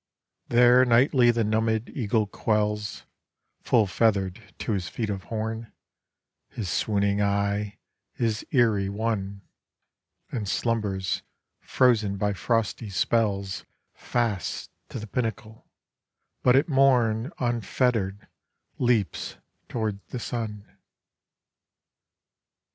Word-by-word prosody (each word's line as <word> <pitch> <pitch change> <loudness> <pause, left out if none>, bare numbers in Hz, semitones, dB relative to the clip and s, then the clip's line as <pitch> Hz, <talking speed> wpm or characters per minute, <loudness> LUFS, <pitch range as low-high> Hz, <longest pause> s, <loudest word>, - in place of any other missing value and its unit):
There 125 +1 +6
nightly 125 +1 +4
the 115 -1 +2
numbèd 110 +1 0
eagle 110 -3 +1
quells 105 0 -1 0.6
(Full 110 -3 +3
feather'd 100 -1 +1 0.2
to - - -3
his 95 -4 -1
feet 110 -3 -3
of 95 -2 -5
horn) 110 +1 -4 0.8
His 100 -6 -5
swooning 100 0 +1
eye, 100 0 0 0.4
his 110 -2 -1
eyrie 110 -7 +3
won, 100 -2 -2 0.9
And 105 -5 -3
slumbers, 100 -3 -1 0.4
frozen 110 -6 +2
by 105 +1 0
frosty 110 +3 -1
spells 100 -1 0 0.3
Fast 115 -7 -2 0.2
to - - -6
the 110 - -5
pinnacle; 110 0 -4 0.7
but 125 0 +5
at 140 +3 +4
Morn 130 -4 +3
Unfetter'd 115 -4 0 0.5
leaps 120 -6 0 0.3
toward 110 -4 -2
the - - -5
Sun. 110 -4 -4
110 Hz, 100 wpm, -26 LUFS, 100-120 Hz, 0.9 s, There